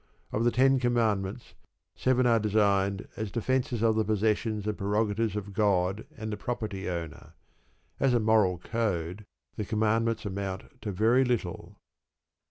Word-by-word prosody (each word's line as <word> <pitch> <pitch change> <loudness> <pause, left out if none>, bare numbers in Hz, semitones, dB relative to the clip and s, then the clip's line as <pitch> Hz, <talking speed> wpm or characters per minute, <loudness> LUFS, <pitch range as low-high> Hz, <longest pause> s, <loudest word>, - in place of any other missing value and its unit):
Of 110 - 0
the 120 - +4
Ten 135 +2 +4
Commandments, 115 -3 0 0.4
seven 130 -1 +2
are 115 -2 +4
designed 100 -2 +1
as 110 -2 -3
defences 120 +1 -1
of 110 -1 +3
the 110 - +2
possessions 110 0 0
and 105 0 -1
prerogatives 105 +1 0
of 100 -1 -5
God 95 -1 +1
and 110 0 -5
the - - -4
property 105 -5 -4
owner. 85 -3 -6 0.7
As 135 -2 +3
a - - +4
moral 105 -5 +3
code 100 -2 -3 0.3
the 105 - -1
Commandments 110 +2 0
amount 100 +6 -5
to 105 - -3
very 115 +7 +3
little. 120 -9 -3
110 Hz, 145 wpm, -28 LUFS, 100-115 Hz, 0.7 s, the